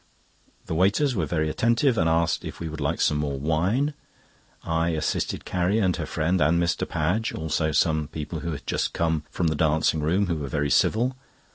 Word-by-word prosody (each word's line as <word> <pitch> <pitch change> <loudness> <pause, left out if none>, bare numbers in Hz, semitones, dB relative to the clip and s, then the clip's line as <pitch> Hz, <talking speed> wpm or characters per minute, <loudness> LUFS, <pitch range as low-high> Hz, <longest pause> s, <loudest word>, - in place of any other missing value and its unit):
The - - -4
waiters 100 - +2
were 85 -9 -1
very 80 -1 0
attentive, 115 - +2
and 85 -6 +2
asked 85 0 +1
if - - -7
we 85 - -4
would 80 -1 -6
like 80 +4 -1
some 75 - +2
more 70 -2 -2
wine. 90 - +1 0.7
I 80 0 0
assisted 80 -2 -2
Carrie 90 +3 0
and 95 -5 +2
her 80 - -4
friend 85 +3 0
and 80 +3 +3
Mr. 85 0 0
Padge, 95 +9 -1
also 80 0 -1
some 80 0 +1
people 80 +1 -5
who 85 +1 -4
had 75 - -7
just - - -1
come 80 -2 0
from 85 - -2
the 80 - -1
dancing 80 +1 +2
room, 85 +7 +1
who 85 -3 -1
were 70 -2 -4
very 75 +1 -1
civil. 125 +4 +2
80 Hz, 195 wpm, -25 LUFS, 80-95 Hz, 0.7 s, and